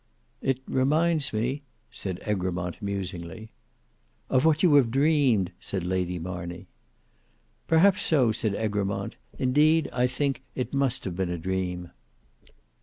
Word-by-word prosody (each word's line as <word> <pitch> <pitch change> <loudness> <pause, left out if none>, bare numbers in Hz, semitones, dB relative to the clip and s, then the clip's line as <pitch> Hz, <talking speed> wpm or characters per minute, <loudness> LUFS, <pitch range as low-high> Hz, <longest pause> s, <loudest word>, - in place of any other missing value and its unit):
"It 135 -1 0
reminds 150 +3 +2
me—" 120 +6 -1 0.3
said 95 -3 -4
Egremont 90 -2 -2
musingly. 100 0 -5 0.8
"Of 130 +3 +3
what 155 0 +3
you 170 -5 +6
have 140 -5 +5
dreamed," 135 - +3
said 95 -3 -4
Lady 90 -1 -1
Marney. 85 0 -6 1.0
"Perhaps 185 +5 +5
so," 140 - +3
said 105 -2 -1
Egremont; 105 -2 -2 0.2
"indeed 150 +4 +3
I 125 +1 +2
think 135 +1 -1
it 125 - -3
must 135 -3 +1
have 90 -3 -4
been 95 -1 -1
a 90 - -2
dream." 90 0 -3
110 Hz, 125 wpm, -27 LUFS, 95-140 Hz, 1.0 s, you